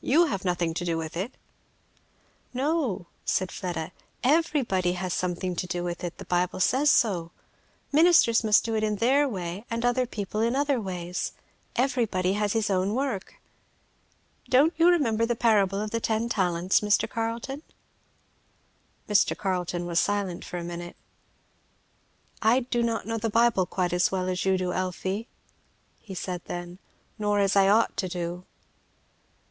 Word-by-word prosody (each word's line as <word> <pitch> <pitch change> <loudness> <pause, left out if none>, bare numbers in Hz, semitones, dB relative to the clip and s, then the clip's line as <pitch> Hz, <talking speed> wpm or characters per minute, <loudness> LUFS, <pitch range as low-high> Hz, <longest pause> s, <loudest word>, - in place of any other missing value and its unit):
you 325 +6 +4
have 195 - -3
nothing 175 -3 0
to 175 - -3
do 170 -2 -1
with 160 0 -5
it?" 195 +9 -3 1.2
"No," 270 - 0 0.2
said 185 -1 0
Fleda, 175 -2 -4 0.3
"everybody 260 - +2
has 180 0 -3
something 180 0 -2
to 180 - -3
do 175 0 -3
with 175 0 -4
it, 175 -1 -4
the - - -9
Bible 180 +1 0
says 265 +10 +3
so; 190 -11 +2 0.6
ministers 305 -7 +5
must 210 -1 +4
do 225 - -2
it 215 - 0
in 215 -1 +1
their 270 +7 +3
way 185 -2 -5
and 230 +1 -2
other 245 +1 +2
people 210 -1 -3
in 235 +3 +1
other 280 -3 +1
ways; 180 -2 -4 0.4
everybody 230 -8 +1
has 210 -1 0
his 220 -2 0
own 190 +3 +1
work. 260 - -3 1.1
Don't 285 +6 +5
you 330 +2 +4
remember 250 -11 +3
the 240 - 0
parable 200 -4 +2
of 210 0 -3
the 230 - 0
ten 225 +1 0
talents, 180 -4 +2
Mr. 210 +1 +2
Carleton?" 230 +5 -4 1.5
Mr. 210 -1 +3
Carleton 180 -2 -2
was 170 -1 +1
silent 200 -4 -1
for 180 - -6
a 175 - -4
minute. 175 0 -6 1.5
"I 235 +4 +4
do 240 -1 -1
not 230 -1 -1
know 225 0 -2
the 225 +1 -1
Bible 225 -4 +3
quite 180 -2 -1
as 180 0 +2
well 185 -1 -1
as 180 0 -2
you 190 0 +3
do, 180 -1 -2
Elfie," 185 +4 -3 0.7
he 195 -4 -9
said 180 -1 -4
then, 175 +1 -6 0.4
"nor 205 -1 +1
as 200 -1 +2
I 195 -1 +5
ought 220 +3 +3
to 185 - -1
do." 175 0 -4
200 Hz, 160 wpm, -27 LUFS, 180-235 Hz, 1.5 s, ministers